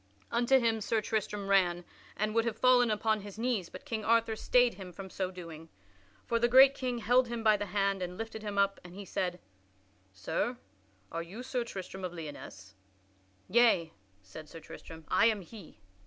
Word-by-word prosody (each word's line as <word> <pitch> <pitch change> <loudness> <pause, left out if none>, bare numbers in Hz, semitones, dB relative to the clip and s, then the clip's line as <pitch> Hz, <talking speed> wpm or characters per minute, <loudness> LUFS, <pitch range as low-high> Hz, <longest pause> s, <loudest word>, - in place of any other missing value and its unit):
Unto 240 +3 +4
him 225 -3 +1
Sir 220 +2 0
Tristram 210 -2 -3
ran, 175 -3 +2 0.3
and 215 +1 -1
would 230 0 +3
have 225 -2 -2
fallen 250 -2 +5
upon 215 0 +1
his 205 0 -10
knees, 225 -6 -1
but - - -11
King 225 -6 -3
Arthur 230 0 +2
stayed 245 +2 +3
him 185 -1 -9
from 190 +1 -9
so 185 -1 -2
doing. 165 -3 -10 0.6
For 235 - 0
the 240 - +3
great 265 +2 +8
king 255 -3 -3
held 245 +2 +3
him 235 -1 -4
by 215 -1 +5
the 205 0 -3
hand 195 0 0
and 180 0 -4
lifted 225 0 -6
him 205 -1 -5
up, 200 0 +2
and 175 0 -12
he 200 0 -8
said, 180 -2 -2 0.7
"Sir, 100 - -2 0.5
are 165 - -3
you 195 +9 -8
Sir 255 -1 -2
Tristram 190 -4 -8
of 180 -1 -4
Lyonesse?" 145 - -9 0.7
"Yea," 225 -9 +3 0.3
said 150 +11 -11
Sir 165 - -10
Tristram, 160 0 -11
"I 230 - +4
am 215 -3 +1
he." 190 - -13
210 Hz, 185 wpm, -31 LUFS, 180-230 Hz, 0.7 s, great